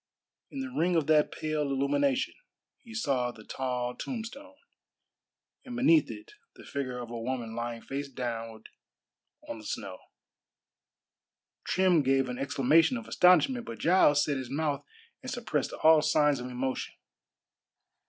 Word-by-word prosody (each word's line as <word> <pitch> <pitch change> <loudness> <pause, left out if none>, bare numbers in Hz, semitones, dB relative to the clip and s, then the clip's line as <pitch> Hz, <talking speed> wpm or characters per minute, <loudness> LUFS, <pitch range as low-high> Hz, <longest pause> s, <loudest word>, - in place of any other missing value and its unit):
In 275 - -5
the 265 -1 -5
ring 180 -5 +1
of 160 -3 +2
that 155 -1 +3
pale 155 -1 -2
illumination 265 - +1 0.5
he 230 - -15
saw 135 - 0
the 110 -3 -14
tall 125 0 -3
tombstone, 270 +4 -7 1.1
and 250 -3 -8
beneath 305 +6 +4
it 330 +6 -9 0.2
the - - -14
figure 130 -3 -4
of 120 -1 -7
a 120 - -5
woman 120 -2 -3
lying 120 0 -5
face 140 +1 -5
downward 115 -3 -5 0.8
on 115 - -6
the - - -12
snow. 95 -3 -5 1.7
Trim 185 -3 +3
gave 135 -1 +2
an 125 - -5
exclamation 155 - +3
of 235 - -8
astonishment, 185 - +4
but 115 - -6
Giles 145 - +4
set 145 -2 -1
his 130 -2 -6
mouth 145 +1 -1 0.4
and 255 - -7
suppressed 230 - -2
all 160 -1 +5
signs 150 -2 +3
of 125 - -5
emotion. 130 +1 -3
145 Hz, 145 wpm, -29 LUFS, 125-190 Hz, 1.7 s, all